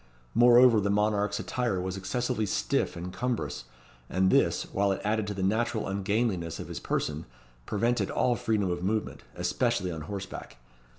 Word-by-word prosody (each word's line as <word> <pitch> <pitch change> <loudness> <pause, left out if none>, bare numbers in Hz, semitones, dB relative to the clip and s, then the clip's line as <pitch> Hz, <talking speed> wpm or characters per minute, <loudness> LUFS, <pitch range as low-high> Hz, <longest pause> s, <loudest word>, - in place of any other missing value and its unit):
Moreover 120 -1 +7
the 100 - 0
monarch's 105 0 +1
attire 120 -7 -1
was 95 +1 -3
excessively 110 +3 -1
stiff - - 0
and 90 +1 -6
cumbrous, 120 - -3 0.4
and 95 0 +2
this, - - +3
while 100 0 +2
it 95 - -1
added 110 0 0
to 105 - -3
the 95 - -3
natural 110 +3 0
ungainliness 100 -3 -1
of - - -7
his - - -5
person, 75 +1 -2 0.4
prevented 115 +3 0
all 125 -1 +1
freedom 105 -5 0
of 85 0 -3
movement, 105 +4 -2
especially 115 -7 0
on 80 -2 -5
horseback. 95 -5 -7
100 Hz, 160 wpm, -28 LUFS, 95-115 Hz, 0.4 s, Moreover